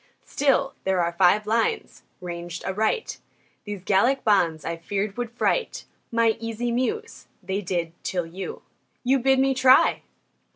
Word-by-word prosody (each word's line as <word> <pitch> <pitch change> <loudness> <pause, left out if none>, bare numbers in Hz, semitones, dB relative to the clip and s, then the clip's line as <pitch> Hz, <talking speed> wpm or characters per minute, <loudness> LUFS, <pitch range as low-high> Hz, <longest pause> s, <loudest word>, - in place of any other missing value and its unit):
Still, 275 -1 +1
there 190 -2 +1
are 170 0 -1
five 190 +4 +3
lines 230 - -1 0.2
ranged 175 -1 -6
aright. 220 - -1 0.5
These 205 -3 -6
Gallic 235 +8 +2
bonds, 170 -7 +2
I 165 - -2
feared, 195 +4 -3
would 245 -1 -3
fright 350 - -1 0.3
My 230 -1 +2
easy 230 +1 -3
Muse. 430 - -3 0.2
They 195 +2 -2
did, 170 -3 -2
till 180 -2 -2
you 180 +4 -7 0.4
You 265 +2 +3
bid 265 +2 +3
me 270 0 +3
try! 260 0 +5
215 Hz, 140 wpm, -24 LUFS, 180-255 Hz, 0.5 s, try